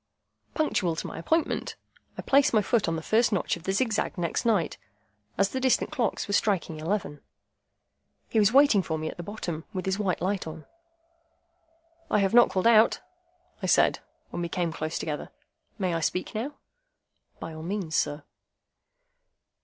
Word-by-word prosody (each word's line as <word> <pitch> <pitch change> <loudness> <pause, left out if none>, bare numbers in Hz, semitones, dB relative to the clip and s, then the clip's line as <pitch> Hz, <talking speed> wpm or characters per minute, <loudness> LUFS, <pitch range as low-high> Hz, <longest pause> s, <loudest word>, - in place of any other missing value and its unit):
Punctual 185 - +1
to - - -5
my - - -6
appointment, 320 - 0 0.4
I - - -5
placed 275 -3 +4
my 210 - +4
foot 225 +1 +1
on 165 - 0
the 160 - -5
first 225 +5 +3
notch 195 - 0
of 170 - -12
the 190 - 0
zigzag 215 0 0
next 175 +7 -1
night, 205 -9 +1 0.6
as 195 0 +3
the 260 - -3
distant 260 +3 +2
clocks 245 -9 -1
were 200 - -3
striking 190 -7 0
eleven. 160 -3 -3 1.1
He 225 - +1
was 210 0 +4
waiting 270 -6 +6
for 160 -2 -3
me 155 0 -3
at - - -14
the - - -5
bottom, 175 -4 -5
with 185 -2 -3
his 190 +1 -1
white 190 -4 0
light 190 -1 -1
on. 160 0 -8 1.4
"I - - +3
have 195 -1 +1
not 240 0 +7
called 185 - -1
out," 230 -1 +5 0.6
I - - -2
said, - - +4 0.3
when - - -4
we 170 - -3
came 170 -2 -1
close 155 0 -3
together; 150 -2 -4 0.5
"may 185 -4 -1
I 165 - 0
speak 180 +3 -2
now?" 260 +7 -4 0.8
"By 165 - -6
all 155 - -8
means, 175 -2 -3
sir." 145 0 0
190 Hz, 175 wpm, -27 LUFS, 165-220 Hz, 1.4 s, not